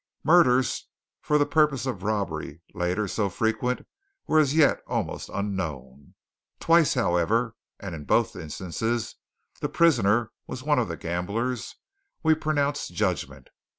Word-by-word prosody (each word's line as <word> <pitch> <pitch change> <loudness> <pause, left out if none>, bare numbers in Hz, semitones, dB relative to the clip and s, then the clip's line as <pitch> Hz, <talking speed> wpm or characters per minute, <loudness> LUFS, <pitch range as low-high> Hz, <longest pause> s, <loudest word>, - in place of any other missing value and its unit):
Murders 130 -7 +4 0.3
for 150 - +2
the 145 - +3
purpose 150 -6 +2
of 120 -8 -3
robbery, 85 -6 -3
later 90 +4 -1
so 100 +1 -1
frequent, 110 +6 -1 0.4
were 155 - +3
as 145 -1 +2
yet 155 -3 +4
almost - - -3
unknown. 75 -10 -5 0.4
Twice, 165 -3 +4
however, 115 +2 +1 0.2
and 95 -3 -6
in 75 -3 -7
both - - +2
instances 95 +9 -3 0.4
the - - -2
prisoner 120 -8 +3 0.2
was 130 0 -6
one 150 -2 +2
of 115 - 0
the 85 - -5
gamblers, 110 +8 -3 0.5
we 160 0 +5
pronounced 145 - -1
judgment. 95 -4 -2
110 Hz, 130 wpm, -26 LUFS, 90-140 Hz, 0.5 s, we